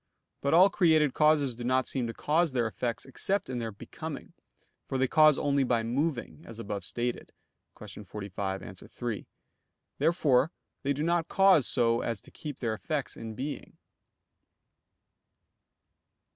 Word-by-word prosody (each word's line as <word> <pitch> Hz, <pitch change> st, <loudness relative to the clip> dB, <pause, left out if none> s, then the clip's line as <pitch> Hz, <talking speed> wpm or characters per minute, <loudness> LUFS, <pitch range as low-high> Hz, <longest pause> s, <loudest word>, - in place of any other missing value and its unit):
But 140 Hz, +3 st, +2 dB
all 185 Hz, +3 st, +7 dB
created 160 Hz, -7 st, +3 dB
causes 150 Hz, -4 st, +3 dB
do 120 Hz, -, -7 dB
not 130 Hz, +1 st, +2 dB
seem 125 Hz, -3 st, -1 dB
to -, -, -3 dB
cause 160 Hz, 0 st, +1 dB
their 120 Hz, -2 st, +1 dB
effects 115 Hz, +1 st, -3 dB
except 190 Hz, +5 st, -1 dB
in 125 Hz, -, -2 dB
their 115 Hz, -1 st, -3 dB
becoming, 100 Hz, -, -8 dB, 0.6 s
for 135 Hz, -, -1 dB
they 130 Hz, 0 st, +2 dB
cause 155 Hz, +1 st, +5 dB
only 140 Hz, -1 st, +2 dB
by 120 Hz, -3 st, +1 dB
moving, 135 Hz, +4 st, -2 dB
as 115 Hz, -, -11 dB
above 105 Hz, -3 st, -5 dB
stated 120 Hz, 0 st, -2 dB, 0.5 s
(Q. 105 Hz, -, -10 dB
45, 100 Hz, -1 st, -5 dB
A. 95 Hz, -, -8 dB
3). 110 Hz, +4 st, -6 dB, 0.7 s
Therefore 150 Hz, -2 st, +3 dB, 0.3 s
they 140 Hz, 0 st, 0 dB
do 145 Hz, +2 st, -3 dB
not 170 Hz, 0 st, +1 dB
cause 195 Hz, -8 st, +5 dB
so 115 Hz, 0 st, +2 dB
as 115 Hz, -3 st, -2 dB
to -, -, -16 dB
keep 150 Hz, -3 st, -7 dB
their 115 Hz, -3 st, 0 dB
effects 140 Hz, +6 st, -3 dB
in 110 Hz, -1 st, -7 dB
being. 140 Hz, +5 st, -6 dB
130 Hz, 150 wpm, -29 LUFS, 115-155 Hz, 0.7 s, all